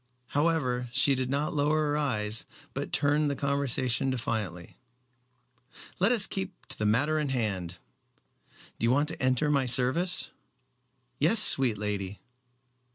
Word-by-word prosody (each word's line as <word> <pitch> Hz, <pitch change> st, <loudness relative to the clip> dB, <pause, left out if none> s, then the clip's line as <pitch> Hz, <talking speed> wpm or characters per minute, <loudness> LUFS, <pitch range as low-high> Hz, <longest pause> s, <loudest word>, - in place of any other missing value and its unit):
However, 140 Hz, -6 st, 0 dB
she 140 Hz, +2 st, +3 dB
did 130 Hz, -1 st, -2 dB
not 145 Hz, +3 st, -1 dB
lower 150 Hz, +1 st, +1 dB
her -, -, 0 dB
eyes 110 Hz, -7 st, -1 dB, 0.3 s
but -, -, -5 dB
turned 145 Hz, +1 st, +1 dB
the 140 Hz, -, -2 dB
conversation 135 Hz, -2 st, 0 dB
defiantly. 105 Hz, -9 st, -4 dB, 1.2 s
"Let 200 Hz, +5 st, +4 dB
us 230 Hz, -5 st, +4 dB
keep 190 Hz, 0 st, -6 dB
to -, -, 0 dB
the 105 Hz, -, +1 dB
matter 145 Hz, +9 st, +2 dB
in 150 Hz, -2 st, -2 dB
hand. 95 Hz, -9 st, -2 dB, 1.0 s
Do -, -, 0 dB
you -, -, +3 dB
want 145 Hz, +4 st, +2 dB
to 160 Hz, -, -7 dB
enter 130 Hz, +3 st, +1 dB
my 140 Hz, -3 st, +1 dB
service?" 130 Hz, +9 st, +1 dB, 0.9 s
"Yes, 165 Hz, +10 st, +3 dB
sweet 130 Hz, -, +3 dB
lady." 100 Hz, -1 st, -4 dB
135 Hz, 140 wpm, -28 LUFS, 115-150 Hz, 1.2 s, Let